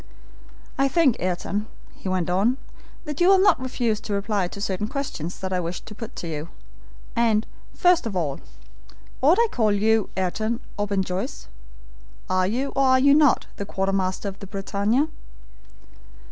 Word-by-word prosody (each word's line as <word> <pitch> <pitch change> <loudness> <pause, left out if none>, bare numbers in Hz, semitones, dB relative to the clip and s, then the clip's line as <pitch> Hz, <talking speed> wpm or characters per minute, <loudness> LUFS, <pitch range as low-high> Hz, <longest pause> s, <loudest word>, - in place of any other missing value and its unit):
"I 275 - +4
think, 285 -4 +3
Ayrton," 185 +4 -2 0.3
he 190 - -6
went 185 -2 0
on, 200 +8 +2 0.5
"that 300 +1 -4
you 350 - +6
will 390 0 +7
not 380 -7 +4
refuse 240 -4 -1
to 210 - -5
reply 200 -2 0
to 200 - -9
certain 200 0 -2
questions 215 - -4
that 190 0 -3
I 180 - +1
wish 170 0 -4
to 215 - -11
put 225 +1 -8
to 170 - -5
you; 155 0 -5 0.7
and, 225 -2 +2 0.3
first 355 -8 +4
of 205 - -5
all, 155 -6 -1 0.8
ought 300 +7 +5
I - - +7
to - - -4
call 220 -3 +3
you 215 +1 +2
Ayrton 215 +5 -1 0.2
or 205 0 -1
Ben 195 -1 +1
Joyce? 195 +10 -4 0.8
Are 185 0 +2
you, 255 +7 -1
or 275 - +3
are 260 0 +5
you 280 +2 +6
not, 295 -2 +4
the 200 - -4
quartermaster 195 0 -1
of 195 0 -6
the 200 - -8
BRITANNIA?" 200 +7 0
210 Hz, 175 wpm, -24 LUFS, 190-260 Hz, 0.8 s, will